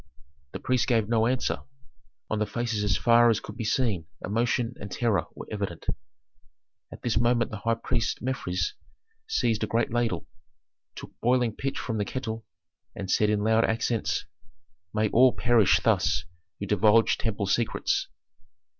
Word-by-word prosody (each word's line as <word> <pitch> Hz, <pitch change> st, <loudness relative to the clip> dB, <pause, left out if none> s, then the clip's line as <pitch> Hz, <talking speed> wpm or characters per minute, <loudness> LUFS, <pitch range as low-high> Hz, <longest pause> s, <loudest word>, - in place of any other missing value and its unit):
The -, -, -5 dB
priest 130 Hz, -2 st, 0 dB
gave 115 Hz, -5 st, +2 dB
no 115 Hz, -1 st, +2 dB
answer; 125 Hz, +1 st, 0 dB, 0.7 s
on 110 Hz, -, -2 dB
the 105 Hz, -, 0 dB
faces 115 Hz, -3 st, -2 dB
as 100 Hz, -2 st, +2 dB
far 120 Hz, 0 st, +5 dB
as 110 Hz, -, +2 dB
could 105 Hz, -, -10 dB
be -, -, -4 dB
seen 105 Hz, -7 st, 0 dB, 0.2 s
emotion 115 Hz, +3 st, 0 dB
and 100 Hz, -, -7 dB
terror 105 Hz, -4 st, 0 dB
were -, -, -8 dB
evident. 100 Hz, -5 st, -4 dB, 1.1 s
At -, -, -11 dB
this 110 Hz, -2 st, +1 dB
moment 120 Hz, 0 st, +2 dB
the 110 Hz, -, -4 dB
high 115 Hz, +2 st, +1 dB
priest 115 Hz, -1 st, -1 dB
Mefres 120 Hz, -8 st, -2 dB, 0.5 s
seized 115 Hz, -, +1 dB
a -, -, 0 dB
great 115 Hz, 0 st, 0 dB
ladle, 120 Hz, -1 st, -1 dB, 0.7 s
took -, -, -9 dB
boiling 120 Hz, -2 st, +2 dB
pitch 135 Hz, 0 st, -3 dB
from 110 Hz, -3 st, -3 dB
the 105 Hz, -, 0 dB
kettle, 115 Hz, -1 st, -4 dB, 0.5 s
and 95 Hz, -1 st, -4 dB
said 105 Hz, -, +3 dB
in 105 Hz, -1 st, +1 dB
loud 110 Hz, +1 st, +3 dB
accents, 110 Hz, -6 st, 0 dB, 0.7 s
"May 110 Hz, 0 st, +1 dB
all 125 Hz, +3 st, +5 dB
perish 120 Hz, -5 st, +4 dB
thus -, -, +2 dB, 0.3 s
who 100 Hz, -, -3 dB
divulge 105 Hz, +3 st, +4 dB
temple 100 Hz, -3 st, -1 dB
secrets!" 110 Hz, +4 st, 0 dB
115 Hz, 155 wpm, -27 LUFS, 105-120 Hz, 1.1 s, far